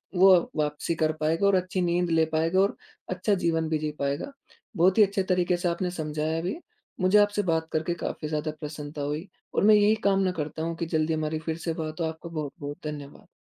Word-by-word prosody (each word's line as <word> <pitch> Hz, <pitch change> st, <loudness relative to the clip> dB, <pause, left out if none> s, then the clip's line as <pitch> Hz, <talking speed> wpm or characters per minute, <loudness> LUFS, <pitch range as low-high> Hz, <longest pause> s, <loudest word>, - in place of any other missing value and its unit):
वो 190 Hz, +2 st, +7 dB, 0.2 s
वापसी 150 Hz, +2 st, -1 dB
कर 155 Hz, 0 st, +3 dB
पाएगा 165 Hz, +5 st, +2 dB
और 200 Hz, -, +4 dB
अच्छी 185 Hz, 0 st, 0 dB
नींद 175 Hz, 0 st, +1 dB
ले 160 Hz, -1 st, +4 dB
पाएगा 165 Hz, +4 st, +2 dB
और 200 Hz, -, +1 dB, 0.3 s
अच्छा 185 Hz, +3 st, 0 dB
जीवन 165 Hz, -1 st, +1 dB
भी 160 Hz, -, +1 dB
जी 155 Hz, 0 st, -2 dB
पाएगा। 140 Hz, -, -2 dB, 0.5 s
बहुत 185 Hz, +4 st, +4 dB
ही 215 Hz, -, +8 dB
अच्छे 195 Hz, -1 st, +1 dB
तरीके 180 Hz, -1 st, +1 dB
से 175 Hz, -, -1 dB
आपने 175 Hz, +1 st, -2 dB
समझाया 155 Hz, 0 st, -2 dB
भी 180 Hz, +4 st, -2 dB
है। 345 Hz, -, -9 dB, 0.4 s
मुझे 185 Hz, +3 st, +5 dB
आपसे 205 Hz, 0 st, +3 dB
बात 160 Hz, -2 st, 0 dB
करके 160 Hz, +2 st, 0 dB
काफ़ी 165 Hz, -2 st, -4 dB
ज़्यादा 155 Hz, 0 st, -2 dB
प्रसन्नता 150 Hz, -1 st, -6 dB
हुई 150 Hz, +5 st, -3 dB, 0.3 s
और -, -, +1 dB
मैं 215 Hz, +1 st, +7 dB
यही 210 Hz, +1 st, +5 dB
कामना 195 Hz, -1 st, +2 dB
करता 155 Hz, +2 st, -4 dB
हूँ 165 Hz, 0 st, -2 dB
कि 170 Hz, -, -2 dB
जल्दी 155 Hz, +1 st, +1 dB
हमारी 155 Hz, 0 st, -1 dB
फ़िर 160 Hz, +1 st, -3 dB
से 165 Hz, 0 st, -3 dB
बात 155 Hz, 0 st, -5 dB
हो। 165 Hz, -, +1 dB
आपको 160 Hz, +1 st, -6 dB
बहुत-बहुत 145 Hz, -2 st, -5 dB
धन्यवाद। 145 Hz, -2 st, -8 dB
165 Hz, 215 wpm, -27 LUFS, 155-185 Hz, 0.5 s, ही